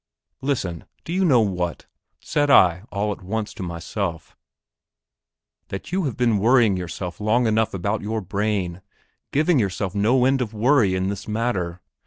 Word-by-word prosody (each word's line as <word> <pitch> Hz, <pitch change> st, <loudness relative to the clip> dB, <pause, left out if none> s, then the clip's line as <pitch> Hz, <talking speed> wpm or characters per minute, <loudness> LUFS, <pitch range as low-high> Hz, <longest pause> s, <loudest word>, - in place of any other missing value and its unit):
Listen; 95 Hz, -, -2 dB, 0.2 s
do 165 Hz, -, -4 dB
you 190 Hz, +1 st, +1 dB
know 135 Hz, -10 st, +5 dB
what, 90 Hz, -5 st, -2 dB, 0.4 s
said 145 Hz, -1 st, 0 dB
I 90 Hz, -6 st, +5 dB
all 105 Hz, +1 st, -1 dB
at 100 Hz, -, -6 dB
once 105 Hz, +3 st, -3 dB
to -, -, -9 dB
myself, 85 Hz, 0 st, -4 dB, 1.3 s
that 95 Hz, -, -7 dB
you 185 Hz, -1 st, 0 dB
have 130 Hz, -, -3 dB
been 115 Hz, -4 st, +2 dB
worrying 115 Hz, -2 st, +4 dB
yourself 90 Hz, +1 st, -5 dB
long 115 Hz, +4 st, +2 dB
enough 110 Hz, -1 st, +2 dB
about 100 Hz, +4 st, -1 dB
your 110 Hz, +2 st, -2 dB
brain, 100 Hz, -2 st, -2 dB, 0.5 s
giving 155 Hz, +1 st, +3 dB
yourself 100 Hz, -2 st, -1 dB
no 120 Hz, +5 st, +3 dB
end 135 Hz, 0 st, +2 dB
of 110 Hz, -3 st, -3 dB
worry 110 Hz, -4 st, +3 dB
in 95 Hz, +1 st, 0 dB
this 100 Hz, -1 st, -5 dB
matter? 100 Hz, -6 st, -2 dB
105 Hz, 160 wpm, -23 LUFS, 95-120 Hz, 1.3 s, know